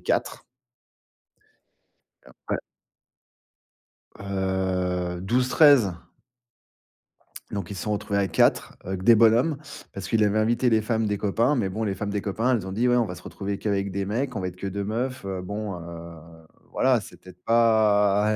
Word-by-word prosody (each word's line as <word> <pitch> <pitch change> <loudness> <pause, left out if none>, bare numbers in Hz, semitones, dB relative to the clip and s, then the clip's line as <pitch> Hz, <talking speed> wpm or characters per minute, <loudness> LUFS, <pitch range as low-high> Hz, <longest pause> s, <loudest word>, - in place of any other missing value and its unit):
4 - - -2 1.8
et - - -16
après - - -5 1.6
Heu, 95 -2 -2
12-13. 125 - +4 1.6
Donc 100 -2 -4
ils - - -5
se 95 - -5
sont 105 - -1
retrouvés 100 0 -1
à 100 - +1
4 - - +2
avec 95 0 -5
des 115 +3 +7
bonhommes, 115 +7 +4 0.4
parce 95 -1 -6
qu'il 110 -1 +3
avait 105 +1 +2
invité 120 +3 +2
les 110 -1 +3
femmes 110 0 0
des 105 0 -1
copains, 115 +8 +1
mais 105 -7 0
bon 110 +4 -3
les 100 -2 -1
femmes 105 - -4
des 100 0 -2
copains, 110 +6 0
elles 105 -6 -1
ont 95 - -5
dit 115 +5 +1
ouais 125 - +4
on 120 - +2
va 90 - -6
se - - -12
retrouver 100 0 -5
qu'avec 100 -1 -1
des 100 +1 -2
mecs, 125 +5 -2
on 105 - -2
va 90 - -2
être 90 - -15
que 100 - -5
2 100 +1 -3
meufs, 120 +5 -3
heu. 95 -1 -4
Bon 105 +1 -5
heu 85 -1 -9 0.5
voilà, 130 -2 +3
c'est - - -13
peut-être 90 -1 -16
pas 105 -2 +3
105 Hz, 175 wpm, -25 LUFS, 95-115 Hz, 1.8 s, des